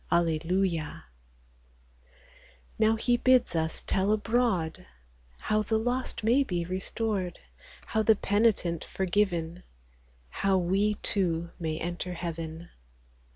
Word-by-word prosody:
Alleluia! 170 0 0 1.8
Now 220 0 +4
he 240 +2 +1
bids 255 -7 +3
us 160 0 0
tell 195 +1 0
abroad 215 -6 0 0.5
How 215 0 +1
the 220 +1 0
lost 245 +1 -2
may 245 +6 +4
be 175 -8 -2
restored, 185 0 -2 0.5
How 220 - 0
the 220 0 +5
penitent 205 -5 +1
forgiven, 180 -3 -1 0.7
How 195 - +1
we, 195 +4 +1
too, 170 -4 +1
may 160 -2 -2
enter 175 +2 -4
heaven. 165 -1 -6
190 Hz, 105 wpm, -28 LUFS, 170-220 Hz, 1.8 s, the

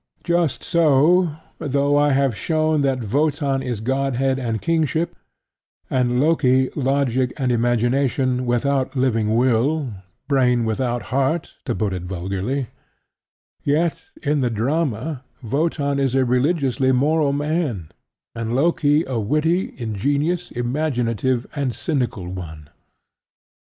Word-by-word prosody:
Just 170 -4 0
so, 165 +1 +3 0.2
though 140 0 +1
I 145 0 +4
have 135 -3 +2
shown 155 +3 +1
that 130 -6 -1
Wotan 145 -2 +1
is 125 -5 -4
Godhead 135 +1 0
and 115 -3 -2
Kingship, 165 +2 0 0.8
and 125 -1 +1
Loki 130 -4 +3
Logic 130 -2 +1
and 130 -4 0
Imagination 125 +2 +1
without 130 +3 0
living 115 -4 +1
Will 130 +3 +1 0.3
(Brain 125 -4 +2
without 120 +2 -1
Heart, 140 +5 0
to 120 -5 -1
put 105 -3 -1
it 90 - -4
vulgarly); 95 +8 -3 0.9
yet 155 +3 0 0.2
in 145 -1 +1
the 125 - +1
drama 130 +3 -1 0.2
Wotan 140 +2 0
is 135 -2 +1
a 135 -1 +3
religiously 130 0 +1
moral 145 +3 +2
man, 145 - -2 0.4
and 115 0 -3
Loki 150 +1 +3
a 130 -3 -2
witty, 155 - 0
ingenious, 145 - -1
imaginative 120 -2 -1
and 140 -5 -2
cynical 125 - -2
one. 80 -5 -8
135 Hz, 115 wpm, -21 LUFS, 120-150 Hz, 0.9 s, I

